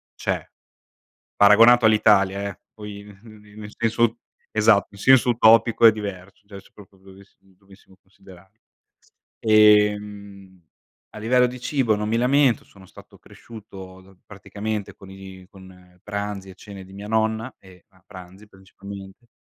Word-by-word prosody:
c'è. - - -4 0.9
Paragonato 115 +4 +5
all'Italia, 100 -2 +2
eh, 95 - -12 0.2
poi, 105 -1 -10
n 100 -1 -16
n 110 -2 -16 0.2
n - - -13
nel 105 0 -11
senso 115 0 -1 0.3
esatto, 110 -2 +2
in 100 - -16
senso 130 0 +4
utopico, 115 0 +4
è - - +6
diverso, 100 -2 -9
cioè, 100 -2 -12
se - - -24
proprio 95 -2 -19
avessi 100 +1 -20
dovessimo 95 0 -23
considerarlo. 95 +1 -20 0.8
Ehm, 105 -3 +1 0.5
a - - -9
livello 125 +3 +2
di 125 0 -9
cibo 125 -4 -1
non 105 +1 -4
mi 115 - 0
lamento. 130 0 +1
Sono 95 -1 -19
stato - - -18
cresciuto, 95 -4 -15
praticamente, 100 +1 -7
con 95 - -16
i 95 -1 -13
con 90 -2 -18
pranzi 100 -2 -6
e 95 - -14
cene 100 -2 -12
di 95 - -18
mia 100 +1 -10
nonna, 110 +2 -2
e 90 -2 -20
a 95 -2 -29
pranzi, 95 +2 -14
principalmente. 95 +2 -14
100 Hz, 145 wpm, -21 LUFS, 95-110 Hz, 0.9 s, è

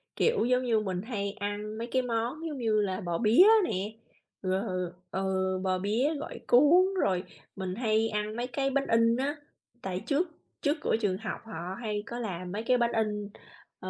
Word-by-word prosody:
kiểu, 465 - +2
giống 250 +1 +2
như 230 -3 +2
mình 185 -3 -2
hay 200 -3 -3
ăn 205 +1 -4
mấy 235 +1 -4
cái 260 - +3
món 245 +7 -2
giống 295 -3 -5
như 220 -3 +2
là 190 -2 -2
bò 175 -2 -2
bía 235 - +6 0.2
nè, 200 - -2 0.5
rồi, 185 -2 -1 0.2
ừ, 190 0 -1 0.3
bò 185 -1 +1
bía 225 +11 +1
gỏi 315 - -6
cuốn, 295 +9 +6 0.2
rồi 185 -1 +1 0.3
mình 185 -1 -4
hay 225 -1 +1
ăn 210 +1 -2
mấy 240 +1 -2
cái 270 +2 -1
bánh 275 0 0
in 230 0 +4
á, 285 +3 -1 0.5
tại 185 -1 -3
trước 325 +4 +1 0.3
trước 295 +1 +1
cửa - - +1
trường 190 -3 +1
học 220 +1 -5
họ 185 -3 -5
hay 210 -2 -2
có 240 +1 -6
làm 180 -5 -4
mấy 215 +3 -3
cái 250 +1 +3
bánh 235 0 +2
in, 210 -2 -1 0.5
ờ, - - -6
220 Hz, 195 wpm, -29 LUFS, 195-250 Hz, 0.5 s, bía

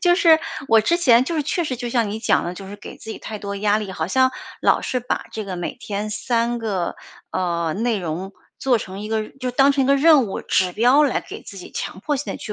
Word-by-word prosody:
就 350 -1 +5
是， 335 -3 +6 0.3
我 225 - +6
之 230 +11 +2
前 250 -7 +5
就 335 - -3
是 310 - +1
确 315 +5 -1
实 275 - -2
就 245 0 -4
像 235 -3 +1
你 215 - -3
讲 225 - +2
的， 175 - -3
就 190 +1 -9
是 205 - -8
给 - - -11
自 220 - -9
己 - - -6
太 215 - -7
多 200 0 -5
压 205 +1 +2
力， 210 -3 -5
好 160 -3 -2
像 260 +7 +3 0.3
老 - - +3
是 255 - -1
把 245 - -2
这 220 - -4
个 185 -2 -4
每 175 - -4
天 210 -3 -4
3 235 +2 0
个 200 -7 -2 0.3
呃 170 -3 -1
内 225 +3 0
容 180 +2 -4 0.3
做 260 -2 +2
成 190 -1 -7
一 210 - -6
个 220 -1 -1
就 255 -2 -5
当 270 +3 +4
成 275 -1 +2
一 - - 0
个 275 +1 +4
任 300 -2 +6
务 195 - -4
指 185 -1 +1
标 245 +8 +5
来 285 -4 +2
给 - - -10
自 195 - -10
己 180 - -10
强 190 - -5
迫 290 +7 -1
性 285 - -4
地 - - -6
去 215 - -6
225 Hz, 280 characters per minute, -22 LUFS, 200-260 Hz, 0.3 s, 是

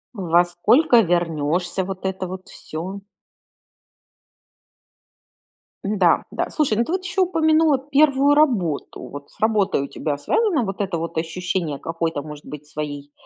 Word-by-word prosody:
Во 175 -2 +3
сколько 230 - +4
вернёшься, 175 0 0
вот 190 0 -6
это 190 -1 -2
вот 185 0 -8
всё? 185 +6 -6 2.9
Н-да, 195 -4 +3
да. - - -2
Слушай, 265 -9 +1
ну 235 - +2
ты - - -5
вот 375 0 -1
еще 380 +1 -1
упомянула 320 -4 +3
1 280 0 +3
работу. 220 - +1
Вот 145 0 -9
с - - -23
работой 215 -9 +2
у 140 - -4
тебя 145 -2 -3
связано 345 - +1
вот 195 -2 -4
это 195 -4 -1
вот 165 0 -5
ощущение 165 -2 -2
какой-то 165 -2 -3
может 150 0 -10
быть 150 0 -9
своей 145 -1 -6
185 Hz, 140 wpm, -22 LUFS, 160-265 Hz, 2.9 s, сколько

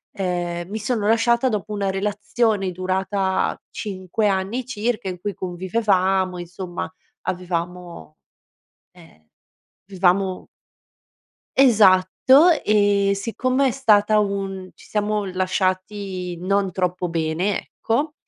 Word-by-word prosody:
ehm, 175 -3 -3
mi 215 +2 -4
sono 220 -1 -1
lasciata 235 +3 +3
dopo 210 -1 -3
una 200 -1 -1
relazione 210 0 0
durata 190 +1 -1
5 200 +1 -2
anni 195 +6 -1
circa, 225 -4 -2
in 180 -1 -6
cui 205 +3 -3
convivevamo, 185 0 0
insomma, 175 0 -6 0.3
avevamo 175 -2 -5 0.8
eh, 80 +1 -19 0.6
vivevamo 190 0 +1 1.1
Esatto, 235 - +6
ehm, 205 -1 +3
siccome 255 +6 0
è - - -1
stata 215 -4 +3
un 195 -2 -3
ci - - -17
siamo 210 -1 -1
lasciati 185 0 -2
non 195 +1 0
troppo 180 0 -1
bene, 165 +4 0
ecco, 290 +7 -2
195 Hz, 100 wpm, -22 LUFS, 185-210 Hz, 1.1 s, Esatto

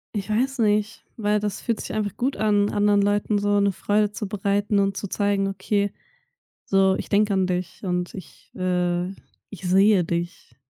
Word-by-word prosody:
Ich 200 0 -3
weiß 255 +4 0
nicht, 210 0 +1
weil 210 -1 +1
das 205 -2 -3
fühlt 230 -3 -2
sich - - -6
einfach 210 -3 -2
gut 265 +3 -1
an, 205 -1 +2
anderen 205 -1 +3
Leuten 205 +1 +1
so 205 0 +2
'ne 200 0 +3
Freude 205 +2 0
zu 210 -1 -5
bereiten 205 +1 0
und 195 0 +1
zu 200 - -4
zeigen: 200 0 0
„Okay, 200 +1 -1 0.7
so 195 -1 +3
ich - - -6
denke 205 0 +2
an 190 -1 +1
dich 180 -1 -3
und 180 -2 -2
ich, 190 - -12
äh, 180 -1 0 0.4
ich 195 -2 -11
sehe 195 0 +5
dich.“ 170 +1 -4
205 Hz, 180 wpm, -24 LUFS, 190-210 Hz, 0.7 s, sehe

